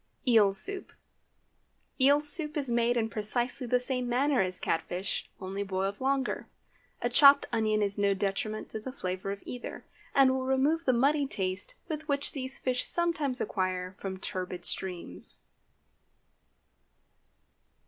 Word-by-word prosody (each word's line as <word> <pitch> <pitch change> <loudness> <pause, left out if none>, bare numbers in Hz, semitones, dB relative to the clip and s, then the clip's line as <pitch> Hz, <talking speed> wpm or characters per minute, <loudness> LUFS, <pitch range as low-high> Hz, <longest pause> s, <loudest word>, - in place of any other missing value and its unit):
EEL 220 -5 +5
SOUP. 385 - +1 1.1
Eel 285 +2 +5
soup 300 0 +3
is 275 -4 0
made 235 +1 +2
in 225 -1 +1
precisely 240 +4 -1
the 250 +1 +2
same 250 -1 -1
manner 265 +2 +2
as 185 -1 0
cat 165 - 0
fish, 180 +4 -4
only 195 +1 -5
boiled 195 +1 -2
longer. 270 0 -1 0.6
A - - +3
chopped 280 +3 +7
onion 215 -1 +1
is 200 0 +1
no 200 -1 +2
detriment 205 +2 -2
to 220 - -4
the 255 +5 -7
flavor 185 -5 -4
of 200 - -7
either, 250 -1 -7 0.3
and 270 -1 +6
will 260 0 -2
remove 285 +5 +1
the 255 - +4
muddy 280 +4 +2
taste 185 -5 -2 0.3
which 280 -1 -1
these 265 -1 -6
fish 250 -1 -1
sometimes 310 -7 +1
acquire 185 -3 -2
from 190 -1 -5
turbid 180 -1 -4
streams. 175 - -1
240 Hz, 140 wpm, -29 LUFS, 195-270 Hz, 1.1 s, chopped